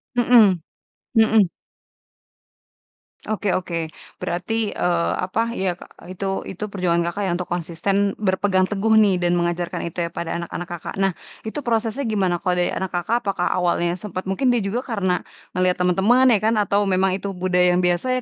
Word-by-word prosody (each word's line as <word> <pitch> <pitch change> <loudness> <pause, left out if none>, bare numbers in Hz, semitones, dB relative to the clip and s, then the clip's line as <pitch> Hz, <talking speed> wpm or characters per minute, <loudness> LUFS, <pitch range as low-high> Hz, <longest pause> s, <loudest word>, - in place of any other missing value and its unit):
Mhm 225 -8 +5 0.6
mhm. 220 -4 +4 1.8
Oke 210 -2 -2
oke. 170 -3 -3 0.3
Berarti, 210 +5 -1
eee, 170 -1 0
apa 225 +5 -1
ya, 190 -2 0 0.3
e 185 - -8
itu 195 +1 -3
itu 190 +3 -7
perjuangan 180 -3 0
Kakak 200 +4 -4
ya 180 - 0
untuk 180 0 -4
konsisten, 195 +4 0
berpegang 190 -1 +1
teguh 210 +2 +1
nih 205 -4 +5
dan 175 0 +1
mengajarkan 175 0 -1
itu 170 +1 -3
ya - - -4
pada 170 0 -3
anak-anak 170 +1 -5
Kakak. 175 -1 -6
Nah, 195 -1 +3 0.3
itu 220 +7 -5
prosesnya 230 +3 0
gimana 190 -5 +1
kalau 180 -1 0
dari - - +1
anak 190 -1 -3
Kakak, 225 +7 -1
apakah 185 -3 0
awalnya 175 0 0
sempat 190 -1 -6
mungkin 245 +6 +2
dia 235 - +1
juga 220 +6 -2
karena 195 -7 -1 0.3
melihat 180 0 +2
teman-teman 215 +9 +4
ya 220 - +5
kan, 225 - +3
atau 205 +1 +1
memang 190 0 +2
itu 195 0 -5
budaya 180 -1 +2
yang 180 - +2
biasa 180 +9 +1
190 Hz, 170 wpm, -22 LUFS, 175-215 Hz, 1.8 s, Mhm